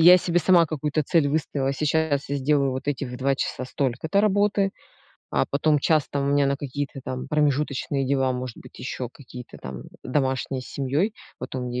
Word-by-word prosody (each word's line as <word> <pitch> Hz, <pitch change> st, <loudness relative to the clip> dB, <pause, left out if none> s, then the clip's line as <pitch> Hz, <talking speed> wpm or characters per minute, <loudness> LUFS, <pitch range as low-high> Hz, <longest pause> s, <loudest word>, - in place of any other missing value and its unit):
я 175 Hz, +2 st, +10 dB
себе 175 Hz, -1 st, +1 dB
сама 175 Hz, -1 st, +5 dB
какую-то 155 Hz, -1 st, -1 dB
цель 145 Hz, 0 st, +2 dB
выставила, 140 Hz, -2 st, 0 dB
сейчас 150 Hz, -1 st, +1 dB
я 140 Hz, -, +1 dB
сделаю 140 Hz, 0 st, +2 dB
вот 130 Hz, +2 st, -4 dB
этих 140 Hz, -2 st, -1 dB
в 125 Hz, -, -6 dB
2 135 Hz, +1 st, +2 dB
часа 130 Hz, -1 st, -3 dB
столько-то 140 Hz, +9 st, 0 dB
работы, 205 Hz, -1 st, +3 dB, 0.6 s
а 65 Hz, -, +2 dB
потом 150 Hz, +1 st, +2 dB
час 155 Hz, 0 st, +2 dB
там 140 Hz, -1 st, -1 dB
у 140 Hz, -, +1 dB
меня 145 Hz, -1 st, +4 dB
на 140 Hz, 0 st, +1 dB
какие-то, 140 Hz, 0 st, -4 dB
там, 130 Hz, 0 st, -4 dB
промежуточные 145 Hz, -2 st, +1 dB
дела, 135 Hz, -1 st, +2 dB
может 125 Hz, -2 st, -5 dB
быть, -, -, -14 dB
еще 125 Hz, -1 st, -4 dB
какие-то 125 Hz, -3 st, -11 dB
там 65 Hz, -1 st, -7 dB, 0.2 s
домашние 130 Hz, -1 st, -1 dB
с -, -, -11 dB
семьей, 145 Hz, -, 0 dB, 0.2 s
потом 125 Hz, 0 st, -4 dB
я 125 Hz, +1 st, -3 dB
140 Hz, 190 wpm, -25 LUFS, 130-155 Hz, 0.6 s, я